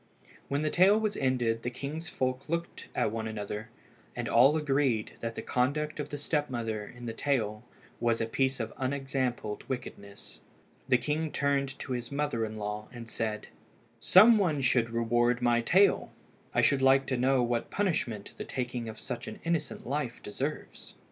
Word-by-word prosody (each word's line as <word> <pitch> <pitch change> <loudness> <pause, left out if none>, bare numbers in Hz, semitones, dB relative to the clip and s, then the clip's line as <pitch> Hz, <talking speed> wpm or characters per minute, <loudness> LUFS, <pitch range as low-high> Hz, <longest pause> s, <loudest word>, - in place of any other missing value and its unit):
When 140 +2 -1
the 155 - 0
tale 195 +4 +5
was 215 -2 -1
ended 120 -4 +1
the 120 - -2
king's 145 +7 -5
folk 130 +2 -2
looked 170 +1 -3
at - - +1
one 110 0 -3
another, 105 0 -5 0.5
and 120 -1 -3
all 135 +6 +5
agreed 135 -7 +1
that 115 0 -4
the - - -5
conduct 150 +5 0
of 145 0 -3
the 145 - -4
step 150 0 -1
mother 110 -4 -3
in 120 0 -10
the 115 - -3
tale 115 -5 -1 0.4
was 115 -1 +1
a 115 - +1
piece 130 +3 0
of 115 -1 -3
unexampled 130 -5 -2
wickedness. 100 -6 -7 0.5
The 125 - +6
king 150 +4 -1
turned 140 -1 0
to - - -7
his 120 0 -3
mother 140 -5 -1
in 110 0 -6
law, 105 0 -4
and 120 -2 -9
said 110 -1 -3 0.5
"Some 215 +4 +7
one 160 -8 +1
should 125 -2 +2
reward 120 +1 +2
my 120 -1 +3
tale. 190 +10 +3 0.4
I - - +2
should 140 -2 +3
like 135 0 +5
to 130 - -1
know 130 +1 +3
what 120 -1 -1
punishment 140 - -1
the - - -2
taking 125 -3 -4
of 110 - -8
such - - -5
an - - -7
innocent 165 -4 -2
life 130 -2 -3
deserves." 135 +9 -5
130 Hz, 175 wpm, -30 LUFS, 115-145 Hz, 0.5 s, Some